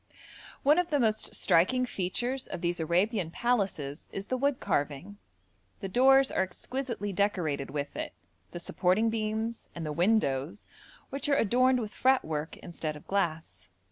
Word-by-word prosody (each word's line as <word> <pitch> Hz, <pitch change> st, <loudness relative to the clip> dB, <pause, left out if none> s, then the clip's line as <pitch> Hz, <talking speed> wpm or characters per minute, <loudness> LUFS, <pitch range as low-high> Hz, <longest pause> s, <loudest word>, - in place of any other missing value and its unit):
One 295 Hz, +5 st, +5 dB
of 355 Hz, -1 st, 0 dB
the 295 Hz, -3 st, +2 dB
most 220 Hz, -3 st, +1 dB
striking 250 Hz, +10 st, +3 dB
features 245 Hz, +6 st, -2 dB
of 170 Hz, -, -5 dB
these 175 Hz, 0 st, -1 dB
Arabian 180 Hz, +3 st, +1 dB
palaces 190 Hz, -, -1 dB
is 195 Hz, -, -5 dB
the 255 Hz, -, -1 dB
wood 275 Hz, +1 st, +1 dB
carving. 165 Hz, +4 st, -2 dB, 0.6 s
The 195 Hz, -, -5 dB
doors 270 Hz, +5 st, +5 dB
are -, -, +1 dB
exquisitely 220 Hz, +2 st, -4 dB
decorated 175 Hz, -8 st, 0 dB
with 145 Hz, 0 st, -4 dB
it, -, -, -4 dB, 0.4 s
the 175 Hz, -, -7 dB
supporting 190 Hz, +6 st, +1 dB
beams, 220 Hz, +1 st, -2 dB
and 170 Hz, -2 st, -4 dB
the 150 Hz, -, -2 dB
windows, 170 Hz, -3 st, +1 dB, 0.5 s
which 275 Hz, +2 st, -2 dB
are 280 Hz, -, +4 dB
adorned 255 Hz, +3 st, +3 dB
with 215 Hz, -3 st, -5 dB
fretwork 160 Hz, -, +1 dB
instead 165 Hz, -3 st, -5 dB
of 150 Hz, -, -12 dB
glass. 155 Hz, -, -2 dB
200 Hz, 150 wpm, -29 LUFS, 165-245 Hz, 0.6 s, One